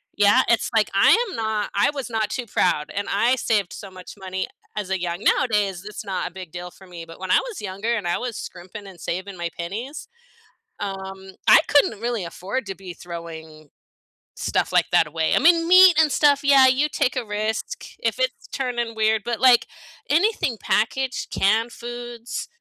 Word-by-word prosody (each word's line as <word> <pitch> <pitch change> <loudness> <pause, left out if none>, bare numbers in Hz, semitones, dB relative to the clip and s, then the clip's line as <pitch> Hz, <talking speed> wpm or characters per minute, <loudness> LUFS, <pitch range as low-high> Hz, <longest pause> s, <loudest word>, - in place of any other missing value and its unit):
yeah, 205 +5 +5
it's, 235 - +2
like, 215 -2 +2
I 195 - +5 0.2
am - - -7
not 220 -2 -2
I 200 - +3
was 275 -4 -5
not 220 -2 0
too 245 +2 -4
proud, 175 -7 0
and 200 0 -3
I 235 +6 +2
saved 205 -6 0
so 200 - -9
much 185 -1 -11
money 190 0 -3
a - - -21 0.3
as 195 -2 -5
a 190 -2 -1
young 175 0 -3
nowadays, 205 -8 +1
it's 210 +1 -8
not 190 -3 -3
a - - -24
big 185 -2 -9
deal 180 0 -7
for 190 +1 -17
me, 170 -2 -9
but 165 0 -13
when 185 0 -6
I - - +6
was - - -7
younger 205 +4 -3
and 200 -6 -3
I 175 - 0
was 245 -3 -5
scrimping 185 +3 -9
and 190 - -12
saving 190 +3 -4
my 170 0 -3
pennies, 225 - -6 0.7
um, 195 -1 -6 0.2
I - - +9
couldn't 280 -7 +3
really 235 -3 -2
afford 195 +8 -4
to 195 - -5
be 185 -2 -9
throwing 160 -3 -9 0.7
stuff - - -1
like - - +4
that - - +5
away 160 +1 0
I - - +4
mean, 330 +2 +4
meat 370 -2 +8
and 305 - +2
stuff, 285 -1 +3
yeah, 275 -2 +7
you 265 +4 +3
take 280 -3 0
a 250 - -2
risk 215 - -3 0.2
if - - -1
it's - - -2
turning 240 -3 -2
weird, 220 0 +2
but, 235 -2 -2
like, 250 -2 +5 0.4
anything 315 - +1
packaged 260 +4 -1
canned 225 +4 +1
foods, 240 0 -7
210 Hz, 195 wpm, -23 LUFS, 185-245 Hz, 0.7 s, I